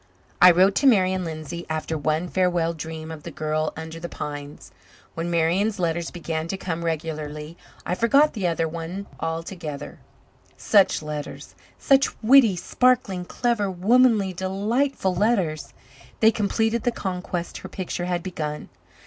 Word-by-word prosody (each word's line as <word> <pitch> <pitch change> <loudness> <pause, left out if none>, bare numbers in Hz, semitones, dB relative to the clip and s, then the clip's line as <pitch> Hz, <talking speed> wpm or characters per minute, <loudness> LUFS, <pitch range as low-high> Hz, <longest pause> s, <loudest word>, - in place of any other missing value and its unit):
I 180 - +10
wrote 185 +3 +5
to 280 - +3
Marian 190 -6 +3
Lindsay 165 +1 -6
after 160 0 -2
one 155 +3 -1
farewell 175 -2 +1
dream 160 0 -7
of 160 -2 -8
the 170 - -7
girl 155 0 -2
under 160 0 -7
the 170 +1 -6
pines. 145 0 -7 0.4
When 165 +1 -3
Marian's 175 +6 +1
letters 170 -2 -1
began 165 -2 -4
to 195 - -3
come 170 -3 -4
regularly 155 -1 -4 0.3
I - - -1
forgot 275 +9 +4
the 200 -6 -1
other 165 -1 0
one 170 +4 -6
altogether. 165 -3 -5 0.6
Such 195 -6 +3
letters 150 -1 -6 0.2
such 275 -1 +2
witty, 235 -4 +6
sparkling, 215 -2 +1
clever, 230 -1 0
womanly, 205 +1 +3
delightful 195 +4 -1
letters! 180 -8 0 0.5
They 220 0 +6
completed 225 +2 0
the 245 - +1
conquest 180 -4 -4
her - - -9
picture 180 -2 -4
had 175 -1 -2
begun. 155 -5 -5
175 Hz, 140 wpm, -24 LUFS, 160-200 Hz, 0.6 s, I